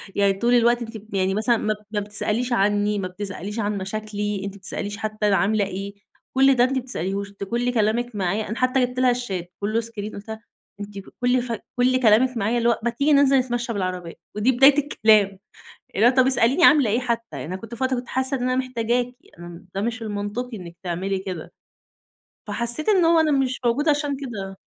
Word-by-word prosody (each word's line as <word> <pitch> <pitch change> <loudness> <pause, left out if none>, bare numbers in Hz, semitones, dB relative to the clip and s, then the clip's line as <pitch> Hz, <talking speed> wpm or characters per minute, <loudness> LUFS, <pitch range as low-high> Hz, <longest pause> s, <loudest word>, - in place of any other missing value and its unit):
يعني 200 -1 +3
طول 235 +5 +1
الوقت 240 0 +4
أنتِ 225 -1 -6
ب 215 0 -15
يعني 190 0 +1
مثلًا 220 +3 +2
ما 215 - 0
ب - - -11
ما 210 - 0
بتسأليش 215 +4 -2
عنّي، 205 0 +1
ما 185 - -2
بتسأليش 200 +3 -6
عن 210 -1 -1
مشاكلي، 210 +1 -3
أنتِ 200 - -5
ما - - -12
بتسأليش 205 +1 -5
حتى 215 0 -2
أنا 200 - +3
عاملة 205 +1 +2
إيه، 195 +1 -6 0.4
كل 270 +1 +5
ده 245 - +4
أنتِ 255 - +1
ما - - +2
بتسأليهوش، 200 -4 -3
أنتِ 200 - -8
كل 240 +4 -1
كلامِك 230 +1 0
معايا" 200 +2 -1
أنا 220 - -3
حتى 255 0 +2
جبت 250 +1 -6
لها 255 -1 +4
الشات 190 -8 -4
كلّه 215 +3 0
اسكرين، 220 -2 -6
قُلتها 220 +2 -8 0.4
أنتِ: 205 -1 -7
"ف - - -13
كل 250 0 +3
ف 245 -1 -6 0.2
كل 255 +1 +3
كلامِك 240 +2 +4
معايا 225 +3 0
اللي 235 0 +2
هو 235 - +1
ما 240 - +2
تيجي 280 +5 +1
ننزل 280 -1 +5
نتمشى 240 -1 -1
بالعربية، 185 -4 -3 0.2
ودي 215 +5 +3
بداية 270 +3 +6
الكلام، 215 -8 +3 0.6
اللي 215 - +4
هو - - +8
طب 260 0 +3
اسأليني 265 +5 +4
عاملة 285 -9 +6
إيه 230 +4 +1
حتى 235 -2 -2
يعني، 130 - -6
أنا - - -2
كنت 225 +4 -9
في 260 - -2
وقت 260 0 +1
كنت 245 0 -5
حاسّة 260 +1 0
إن 250 - -5
أنا 255 0 +1
محتاجاكِ، 245 -1 -1 0.2
أنا 175 - -9
م 175 +1 -12
ده 195 - -2
مش 230 +2 -3
المنطقي 215 +3 -4
إنِّك 170 -3 -10
تعملي 190 +2 -2
كده." 185 -4 -7 1.0
فحسّيت 240 - 0
إن 380 -5 +4
هو 330 0 +5
أنا 315 -1 +2
مش 265 -2 0
موجودة 275 +6 +2
عشان 290 -1 0
كده، 200 -8 -7
225 Hz, 220 wpm, -23 LUFS, 200-250 Hz, 1.0 s, هو